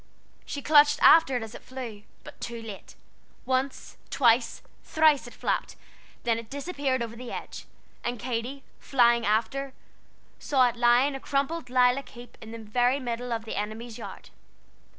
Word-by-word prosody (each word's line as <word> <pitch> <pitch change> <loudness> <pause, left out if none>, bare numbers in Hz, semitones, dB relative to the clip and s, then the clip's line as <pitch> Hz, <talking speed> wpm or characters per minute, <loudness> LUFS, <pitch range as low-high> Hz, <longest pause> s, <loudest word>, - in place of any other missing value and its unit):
She 285 - -5
clutched 295 -1 +6
after 315 -6 +7
it 240 - -4
as 225 0 -9
it - - -10
flew, 245 -5 -8 0.2
but - - -13
too 235 -1 -5
late. 220 -4 -10 0.5
Once, 260 +1 -2
twice, 235 -2 +2 0.2
thrice, 310 -6 +3
it 240 - -11
flapped, - - -2 0.5
then 230 -1 +1
it 230 -1 -11
disappeared 280 -3 -2
over 230 0 -7
the 245 0 -8
edge, - - -7 0.4
and 240 +1 -2
Katy, 245 +4 -4 0.2
flying 235 -3 +3
after, 260 +6 0 0.7
saw 260 -3 +3
it 240 - -2
lying 240 +4 +4
a 270 - -5
crumpled 280 +1 -2
lilac 250 +2 +3
heap 240 0 -13
in 220 - -10
the 230 - -7
very 245 +5 +1
middle 245 -1 -4
of 225 -1 -2
the 220 - -5
enemy's 220 +3 -5
yard. - - -10
245 Hz, 160 wpm, -27 LUFS, 230-275 Hz, 0.7 s, after